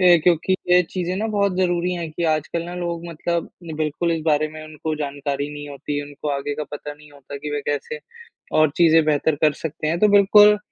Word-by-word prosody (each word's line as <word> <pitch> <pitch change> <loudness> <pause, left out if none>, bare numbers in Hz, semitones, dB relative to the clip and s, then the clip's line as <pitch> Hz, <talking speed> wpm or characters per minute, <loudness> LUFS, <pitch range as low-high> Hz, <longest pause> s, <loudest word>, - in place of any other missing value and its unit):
ए, 180 -2 +7
क्योंकि 175 +1 +3 0.2
ये 180 0 +6
चीज़ें 180 +1 -3
ना 215 +3 -1
बहुत 200 -3 0
ज़रूरी 180 -1 +1
हैं 170 -2 -4
कि 170 - -3
आजकल 155 +2 -2
ना 175 +1 -7
लोग 170 -1 -4
मतलब 170 +1 -3 0.3
बिल्कुल 155 +2 -1
इस 160 -1 -2
बारे 155 0 +2
में 155 0 -10
उनको 155 0 -4
जानकारी 145 -1 -3
नहीं 145 0 -7
होती, 145 +1 -4
उनको 145 +1 -7
आगे 140 +1 -2
का 150 +1 -4
पता 145 0 -6
नहीं 150 0 -18
होता 140 0 -10
कि 150 +1 -6
वह 145 - -1
कैसे 145 - -2 0.6
और 155 -1 +5
चीज़ें 165 -2 +5
बेहतर 150 0 +1
कर 150 - +5
सकते 155 -1 -4
हैं, 165 +2 0
तो 210 - +5
बिल्कुल 205 +1 +6
155 Hz, 215 wpm, -22 LUFS, 145-175 Hz, 0.6 s, ए